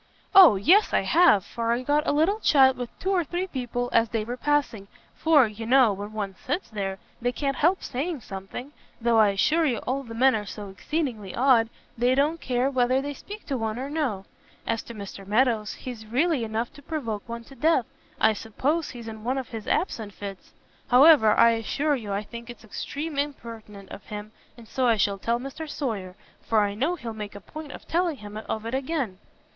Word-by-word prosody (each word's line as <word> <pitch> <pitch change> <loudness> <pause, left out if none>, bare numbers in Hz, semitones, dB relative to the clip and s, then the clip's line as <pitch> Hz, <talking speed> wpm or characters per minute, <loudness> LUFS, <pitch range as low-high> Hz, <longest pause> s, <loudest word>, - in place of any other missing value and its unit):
"O 370 - +9
yes 355 - +4
I - - +4
have, 325 - +4
for 230 0 -2
I 240 +2 0
got 295 +3 +1
a - - +3
little 325 +9 +2
chat 265 -8 +5
with 245 -1 -5
two 380 - -2
or 365 -3 +2
three 350 +4 -3
people 245 -6 -3
as 230 -1 +4
they 225 -2 -1
were 240 +3 -4
passing, 260 -7 0 0.3
for, 310 -5 +4
you 220 +1 -6
know, 250 -4 +5
when 205 +2 -7
one 205 -3 -4
sits 295 +1 -3
there, 195 -2 -3 0.2
they 245 +1 +1
can't 275 0 -2
help 350 +5 +2
saying 290 +3 -3
something; 195 +7 -8 0.3
though 235 -1 +3
I 215 -2 +6
assure 300 +12 +2
you 245 -4 0
all 265 +2 -2
the 230 -4 -9
men 260 +3 +5
are 210 -2 -3
so 205 -1 -7
exceedingly 225 - -3
odd 240 -3 +4 0.3
they 245 +2 +2
don't 300 +4 +1
care 250 +1 0
whether 255 0 +2
they 285 +1 -4
speak 415 +9 -10
to 270 -4 -2
one 220 0 -2
or 270 +3 -5
no. 255 -12 -2 0.4
As 230 -1 -1
to 235 - -9
Mr 200 -1 -8
Meadows, 215 +1 +1
he's 235 -4 -8
really 275 +3 +1
enough 225 +1 -3
to 290 - -14
provoke 235 -9 -4
one 235 0 -5
to 270 - -15
death. 305 -4 +2 0.3
I 220 - +4
suppose 275 +10 -1
he's 235 -2 -9
in 220 -1 -8
one 255 +3 -1
of 260 -3 -4
his 225 -3 -7
absent 220 - -1
fits. 195 -2 -8 0.4
However, 255 -4 +7
I 230 - +7
assure 280 +7 0
you 220 -6 -6
I 200 +1 -1
think 235 +2 -10
it's 240 - -10
extreme 285 +7 -5
impertinent 225 -8 -6
of 200 - -9
him, 210 0 -7 0.3
and 235 -2 -13
so 255 +2 0
I 230 -2 +4
shall 200 -1 +1
tell 235 +4 0
Mr 275 +5 -7
Sawyer, 205 -12 -4 0.3
for 220 -2 +2
I 205 -1 0
know 280 +12 0
he'll 235 -9 -6
make 210 -2 -7
a - - -7
point 310 +8 -9
of - - -11
telling 340 -3 0
him 210 -1 -9
of 220 0 -3
it 230 - -4
again." 265 - -2
240 Hz, 210 wpm, -26 LUFS, 215-285 Hz, 0.4 s, O